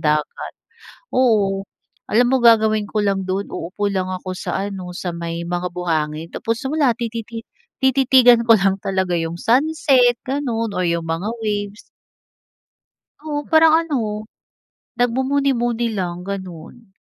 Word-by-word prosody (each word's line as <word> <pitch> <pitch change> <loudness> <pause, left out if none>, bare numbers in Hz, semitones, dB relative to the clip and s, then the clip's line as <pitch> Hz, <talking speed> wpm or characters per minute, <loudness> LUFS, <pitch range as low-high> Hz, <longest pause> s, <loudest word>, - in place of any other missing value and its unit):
dagat. 150 -2 -1 0.6
Oo, 210 -6 +2 0.5
alam 240 +4 +4
mo 265 - +3
gagawin 220 -2 +4
ko 215 - 0
lang 195 -1 +1
dun? 190 +2 -2
Uupo 185 +5 -4
lang 190 -2 -2
ako 185 0 -5
sa - - -3
ano, 185 -3 -7
sa 175 -2 -4
may 170 0 -5
mga 175 +1 -2
buhangin, 160 -2 -2
tapos 230 0 -2
wala, 295 -2 +2
tititi 230 -1 -5 0.4
tititigan 255 -3 +5
ko 230 - +8
lang 195 0 +1
talaga 190 -2 -1
'yong 165 0 -3
sunset 260 - +3
ganun 250 -5 -2
or 185 - -1
'yong 170 0 0
mga 165 +6 -2
waves. 205 0 -3 1.4
Oo, 295 -1 -2
parang 320 0 +6
ano, 220 -9 -3 0.7
nagmumuni-muni 245 -2 0
lang, 175 -2 -3
ganun. 190 +2 -8
210 Hz, 130 wpm, -20 LUFS, 185-245 Hz, 1.4 s, ko